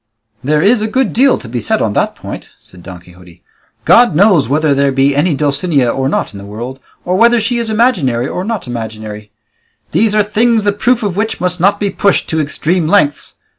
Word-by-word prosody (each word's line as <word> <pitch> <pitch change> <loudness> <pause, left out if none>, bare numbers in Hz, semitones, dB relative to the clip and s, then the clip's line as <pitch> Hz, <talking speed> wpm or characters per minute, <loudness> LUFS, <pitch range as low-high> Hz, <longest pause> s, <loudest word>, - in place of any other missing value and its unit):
"There 150 +3 +1
is 215 +3 +3
a 215 - -1
good 260 +1 -1
deal 265 +3 +3
to - - -11
be 120 +1 -4
said - - 0
on - - -1
that - - -1
point," - - -9
said 90 - -18
Don 90 0 -10
Quixote; 90 -1 -18 0.4
"God 240 -8 +5
knows 175 - +3
whether 150 +1 +1
there 140 0 +1
be 135 +1 +1
any 150 +2 +1
Dulcinea 140 -2 0
or 135 +1 -2
not 140 - -2
in 100 - -9
the - - -10
world, 120 +6 -7 0.3
or 180 +1 0
whether 235 +2 +4
she 235 +2 -1
is 230 -1 -3
imaginary 180 - +1
or 180 - -4
not 225 0 -4
imaginary; 110 -3 -7 0.6
these 215 -1 +1
are 210 - +3
things 220 +2 +1
the 205 0 +1
proof 235 +3 0
of 200 -4 -2
which 220 +3 -2
must 180 0 -1
not 200 +4 +2
be 200 -1 -1
pushed 200 0 +1
to 160 -1 0
extreme 155 +3 -1
lengths. 155 -6 0
165 Hz, 210 wpm, -14 LUFS, 130-210 Hz, 0.6 s, God